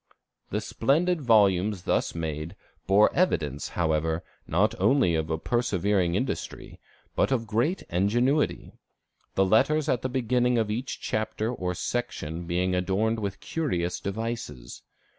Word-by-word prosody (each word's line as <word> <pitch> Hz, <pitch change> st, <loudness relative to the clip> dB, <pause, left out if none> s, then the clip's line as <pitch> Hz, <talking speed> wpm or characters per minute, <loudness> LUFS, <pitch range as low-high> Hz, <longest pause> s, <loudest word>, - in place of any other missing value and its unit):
"The -, -, -1 dB
splendid 160 Hz, +7 st, +1 dB
volumes 100 Hz, -5 st, +3 dB
thus -, -, 0 dB
made, 80 Hz, -1 st, -4 dB, 0.3 s
bore 100 Hz, +2 st, +5 dB
evidence, 75 Hz, -, 0 dB
however, 80 Hz, -1 st, 0 dB, 0.2 s
not 100 Hz, +7 st, +2 dB
only 130 Hz, -11 st, +3 dB
of 80 Hz, -1 st, -1 dB
persevering 100 Hz, -6 st, +1 dB
industry, 130 Hz, +6 st, -4 dB, 0.4 s
but -, -, +2 dB
of 120 Hz, -4 st, +1 dB
great 120 Hz, -, 0 dB
ingenuity; 120 Hz, -, +1 dB, 0.6 s
the 95 Hz, -, +4 dB
letters 150 Hz, +10 st, +3 dB
at 125 Hz, -5 st, +1 dB
the 130 Hz, -, -2 dB
beginning 125 Hz, -1 st, +1 dB
of 110 Hz, -2 st, 0 dB
each 125 Hz, +5 st, -3 dB
chapter 110 Hz, +2 st, -2 dB
or 90 Hz, -5 st, -3 dB
section 85 Hz, -8 st, -3 dB
being 90 Hz, +1 st, 0 dB
adorned 100 Hz, +5 st, 0 dB
with 100 Hz, -2 st, -4 dB
curious 90 Hz, -, -2 dB
devices. 100 Hz, -, -5 dB
105 Hz, 125 wpm, -27 LUFS, 90-120 Hz, 0.6 s, bore